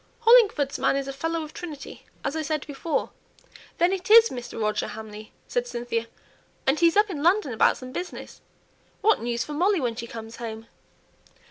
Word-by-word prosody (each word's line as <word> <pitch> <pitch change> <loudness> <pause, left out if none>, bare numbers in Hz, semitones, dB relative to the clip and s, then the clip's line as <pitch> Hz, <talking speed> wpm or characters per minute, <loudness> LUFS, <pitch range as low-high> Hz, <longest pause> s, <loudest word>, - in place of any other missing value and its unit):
"Hollingford's 430 - +5
man - - +2
is 275 0 -2
a 275 - -4
Fellow 325 +4 -2
of 305 - -10
Trinity, 310 -5 -9 0.2
as 285 - -1
I 315 - -1
said 310 -1 -2
before." 295 +2 -2 0.7
"Then 350 +2 +3
it 375 0 -4
is 455 +1 +8
Mr. 245 -2 -7
Roger 215 -1 0
Hamley," 215 0 -9 0.2
said 245 0 -1
Cynthia; 240 -1 -3 0.6
"and 270 +3 +2
he's 335 +2 +4
up 415 -1 +4
in 295 -5 -4
London 340 - +2
about 220 - +3
some 255 0 -9
business! 355 +7 -7 0.6
What 440 +1 +3
news 235 0 -1
for 300 - -7
Molly 370 +5 +2
when 240 -5 -1
she 235 0 -6
comes 225 0 -9
home!" 225 -1 -6
280 Hz, 185 wpm, -25 LUFS, 235-345 Hz, 0.7 s, is